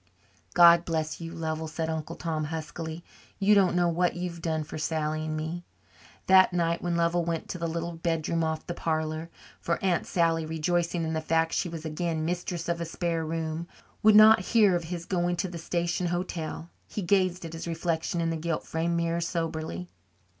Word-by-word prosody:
"God 170 -1 +8
bless 160 -1 -2
you, 165 0 -6
Lovell," 160 -1 -3
said 160 +1 -3
Uncle 160 +1 -4
Tom 160 -3 -2
huskily. 160 +1 -5 0.3
"You 200 +1 +4
don't 190 -3 +4
know 175 -1 +3
what 175 +1 +1
you've 175 -1 -5
done 160 -2 -1
for 155 - -7
Sally 155 0 -1
and 155 0 -2
me." 160 +3 -4 0.6
That 185 -1 +6
night, 170 -1 +1
when 175 -1 -1
Lovell 170 +1 +2
went 165 -1 -2
to 180 - -4
the 170 - -1
little 170 +1 -3
bedroom 165 0 -1
off 160 0 -2
the 175 - -4
parlour 160 0 -2 0.3
for 170 - -1
Aunt 180 -3 +1
Sally, 165 -2 +2
rejoicing 165 +2 0
in 160 0 -2
the 160 - -1
fact 160 +1 +1
that - - -1
she 175 - 0
was 165 -1 -7
again 160 0 -2
mistress 175 0 -3
of 170 0 -1
a - - -1
spare 165 0 -2
room, 160 +1 -3 0.3
would 215 0 +6
not 215 +1 +9
hear 205 0 +4
of 170 -1 -2
his 170 0 -5
going 175 -1 0
to 185 - -1
the 175 -2 -7
station 170 +1 -1
hotel 170 -2 -4 0.2
he 205 - -4
gazed 185 -1 +1
at 165 - -7
his 165 +1 -6
reflection 165 0 -1
in 165 0 0
the 165 - -2
gilt 165 0 -2
framed 170 +1 -1
mirror 170 0 0
soberly. 160 - -3
170 Hz, 195 wpm, -28 LUFS, 160-175 Hz, 0.6 s, not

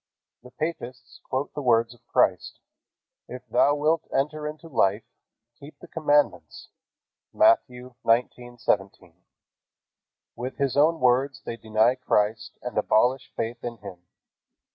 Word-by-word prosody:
The 125 - -14
papists 130 -3 -6
quote 135 +2 -2
the 145 - -5
words 115 -2 +2
of 120 - -24
Christ: - - +1 0.7
"If 125 0 -10
thou 125 +6 +3
wilt 155 +2 0
enter 150 +2 -1
into 155 +2 -8
life, 105 -7 +1 0.6
keep 145 +1 -13
the 175 - -14
commandments." 150 -3 0 0.6
(Matt. 330 +2 +5
19:17.) 120 -6 -2 1.2
With 125 +2 -6
His 140 -2 0
own 160 +3 +3
words 130 +2 +1
they 115 - -4
deny 110 +1 +2
Christ 110 -3 -1
and 125 - -6
abolish 125 +5 +1
faith 115 +1 -4
in 120 -1 -5
Him. 90 -4 -12
125 Hz, 120 wpm, -25 LUFS, 115-145 Hz, 1.2 s, Matt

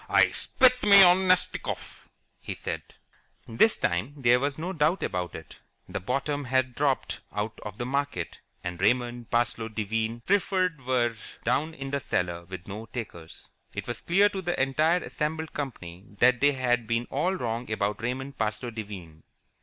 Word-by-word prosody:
"I - - +5
spit 255 -1 +4
me 200 -1 +9
of 180 -1 +8
Nastikoff!" 185 -1 -1 0.3
he - - -6
said. - - -4 0.7
This 120 - +3
time 90 +12 -1
there 125 -2 +4
was 140 +1 -1
no 175 +4 -3
doubt 160 +3 +1
about 90 -2 -3
it. - - -11 0.3
The - - -4
bottom 140 +7 -2
had 130 0 +1
dropped 140 0 0
out 105 +1 -4
of 105 -1 -8
the 120 - -3
market, 140 -9 -2 0.2
and 90 0 -5
Raymond 120 +2 +1
Parsloe 120 -1 0
Devine 110 +1 -2
Preferred 185 -3 +1
were 120 -3 +2 0.3
down 150 +7 0
in 135 -2 -6
the 140 - 0
cellar 85 -8 -2
with 90 0 -9
no 105 +3 -7
takers. 100 -9 -8 0.2
It - - -4
was 120 - -5
clear 195 +4 +4
to 195 -2 -4
the 175 -1 -2
entire 155 +6 +2
assembled 160 +1 -3
company 95 -11 -6
that 125 +2 +4
they 145 0 +5
had 120 -3 0
been 115 +1 0
all 175 +7 +1
wrong 120 -6 -3
about 105 0 -1
Raymond 130 +3 -4
Parsloe 110 +2 -2
Devine. 95 -8 -8
125 Hz, 165 wpm, -27 LUFS, 110-150 Hz, 0.7 s, me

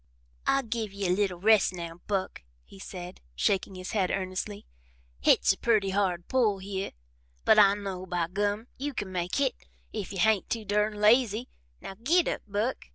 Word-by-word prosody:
"I 275 0 +3
give 225 -3 -3
ye 200 0 -4
a 180 - +2
little 185 -2 0
rest 210 -1 +4
now, 170 -1 -7
Buck," 195 - -2 0.2
he 195 - -15
said, 180 -2 -8
shaking 190 - 0
his 185 0 -6
head 195 -4 +1
earnestly. 190 +2 -3 0.5
"Hit's - - +4
a - - -13
purty 215 -4 +2
hard 185 -3 0
pull 230 -6 +2
hyeh, 195 0 -4 0.5
but 215 - +6
I 200 -1 +7
know, 190 -2 -5
by 175 -2 -1
Gum, 205 +4 -1
you 285 0 -3
can 200 -5 -4
make 180 -1 -2
hit 275 -2 +2 0.4
if 210 -4 -4
you 195 - -5
hain't 210 +2 +2
too 225 -2 -2
durn 210 +1 +1
lazy. 225 +2 +3 0.3
Now, - - -7
git 335 +8 +3
up, - - -2
Buck!" 210 +5 -2
200 Hz, 180 wpm, -28 LUFS, 185-220 Hz, 0.5 s, I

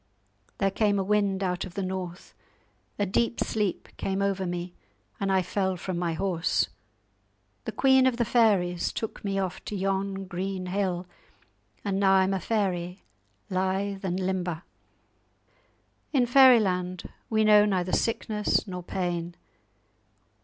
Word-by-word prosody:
There 195 0 +1
came 205 0 +2
a 195 - +1
wind 200 -1 +1
out 180 -1 -1
of 185 -3 -9
the 200 - -2
north, 185 -1 -5 0.6
a 205 - +1
deep 230 +5 0
sleep 210 -4 -1
came 195 0 -2
over 195 -1 0
me, 175 0 -4 0.5
and 195 -1 0
I 190 -1 +3
fell 190 +1 -1
from 175 0 -4
my 170 -2 -1
horse. 165 - 0 1.0
The - - -3
queen 265 -1 +4
of 250 -2 +1
the 240 - +1
fairies 200 -7 +2
took 220 - -5
me 195 -1 -1
off 190 -2 -3
to 210 - -4
yon 195 0 -1
green 185 +1 -4
hill, 180 -1 -1 0.8
and 195 -1 0
now 195 -1 +4
I'm 190 0 +3
a 190 - 0
fairy, 185 -3 -2 0.5
lithe 190 +1 -1
and 185 -1 -1
limber. 180 -3 -2 1.5
In 260 -4 +3
Fairyland 210 -9 +4 0.2
we 220 -1 +2
know 210 -1 +6
neither 185 -3 0
sickness 215 -2 0
nor 180 -3 -6
pain. 175 -1 -3
190 Hz, 140 wpm, -27 LUFS, 180-205 Hz, 1.5 s, know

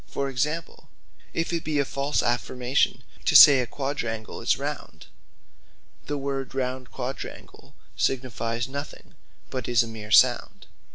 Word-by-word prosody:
For 140 0 -3
example 150 +5 -3 0.4
if 165 +1 -2
it 170 - -1
be 155 -1 -2
a 140 - +2
false 140 +2 -1
affirmation 125 +2 0 0.2
to - - +2
say 140 -2 +10
A 125 - -1
Quadrangle 120 -5 -4
Is - - +2
Round, - - -6 1.0
the 145 - -2
word 135 -1 -4
Round 130 -1 -3
Quadrangle 130 +1 -8 0.2
signifies 120 -2 -1
nothing; 140 +2 -8 0.4
but 130 -1 -4
is 120 -1 +4
a - - -7
meere 110 -2 -9
sound. 110 - +3
130 Hz, 135 wpm, -25 LUFS, 120-140 Hz, 1.0 s, say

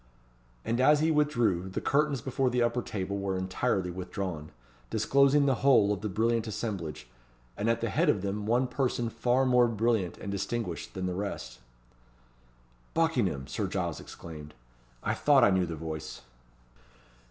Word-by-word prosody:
And 120 +2 0
as 150 +3 +5
he 160 +1 +3
withdrew, 120 - +1
the 95 - -3
curtains 145 -2 +1
before 130 +1 0
the 125 -1 +1
upper 120 +1 0
table 100 -2 -4
were 95 -1 -2
entirely 95 0 -1
withdrawn, 90 -3 -5 0.4
disclosing 140 +6 +3
the 135 - +3
whole 120 -7 +5
of 100 - -5
the 105 - -3
brilliant 115 +3 0
assemblage, 90 -9 -4 0.5
and 105 +3 -1
at 115 0 +1
the 115 - -1
head 165 +1 +2
of 100 -9 +1
them 105 +1 -3
one 120 +3 +3
person 125 -2 -1
far 125 +3 +1
more 125 -1 +5
brilliant 110 -4 0
and 100 - -6
distinguished 100 -2 -4
than 95 -1 -3
the 90 - -1
rest. 90 -10 -5 1.4
"Buckingham!" 120 - +1
Sir - - -3
Giles - - -2
exclaimed. 75 -2 -10 0.5
"I - - 0
thought 140 -4 +4
I 105 - +6
knew 95 -2 +2
the 80 - -4
voice." 80 -1 -6
110 Hz, 160 wpm, -29 LUFS, 95-125 Hz, 1.4 s, I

